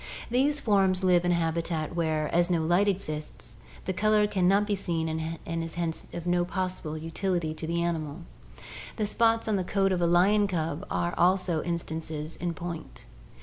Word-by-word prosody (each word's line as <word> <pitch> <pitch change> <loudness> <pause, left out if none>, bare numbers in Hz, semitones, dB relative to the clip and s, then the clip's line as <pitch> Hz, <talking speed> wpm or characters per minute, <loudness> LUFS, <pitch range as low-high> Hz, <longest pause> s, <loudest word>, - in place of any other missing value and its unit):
These 280 +4 +2
forms 195 -5 +2
live 180 -1 +4
in 175 - +3
a - - +3
habitat 165 -1 -1
where, 155 -2 0
as 175 +1 +3
no 170 -3 +1
light 175 +5 +3
exists, 155 - -4 0.3
the 190 - -1
color 215 +2 +3
can 190 -3 +1
not 200 +2 +4
be 205 - -1
seen 170 -5 -1
and 160 0 -2 0.2
hence 165 0 -3
is - - -22
of 170 - -6
no 175 0 +2
possible 180 -4 -3
utility 165 0 -2
to 160 0 -6
the 170 +1 0
animal. 160 -1 -3 0.7
The 215 - -1
spots 225 +2 +2
on 215 -2 +2
the 185 - -1
coat 195 +1 +1
of 180 -1 0
a 170 - +3
lion 200 +4 +4
cub 165 -1 -3
are 175 0 -1
also 180 -2 +3
instances 160 -2 -4
in 175 -1 -3
point. 170 -2 -7
175 Hz, 185 wpm, -28 LUFS, 165-195 Hz, 0.7 s, live